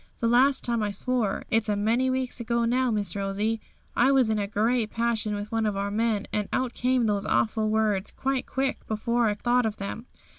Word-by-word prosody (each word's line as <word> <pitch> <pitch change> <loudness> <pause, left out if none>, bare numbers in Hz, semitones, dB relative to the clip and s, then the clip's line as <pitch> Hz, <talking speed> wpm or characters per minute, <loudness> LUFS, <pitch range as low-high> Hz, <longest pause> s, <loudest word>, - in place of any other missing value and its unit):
The 230 - +1
last 265 +4 +4
time 235 -2 0
I 210 - 0
swore 220 0 -1
(it's 225 -1 +1
a 205 - +2
many 230 +5 +1
weeks 255 -1 -2
ago 235 0 0
now, 250 +2 +2
Miss 205 -5 0
Rosie), 205 +3 -1 0.3
I 260 +3 +4
was 260 -5 +3
in 215 - 0
a 200 - -1
great 220 +2 +1
passion 225 -2 -1
with 205 +1 -6
one 225 -1 0
of 205 -2 -2
our 200 0 -2
men, 215 -1 0
and 210 -1 -1
out 255 -2 -1
came 250 -1 +1
those 205 -2 0
awful 220 0 +1
words, 215 -3 +1
quite 270 -1 -1
quick, 270 0 -2
before 235 +2 0
I 205 - 0
thought 245 +2 +2
of 215 - -4
them. 215 +4 -6
225 Hz, 215 wpm, -26 LUFS, 210-245 Hz, 0.3 s, last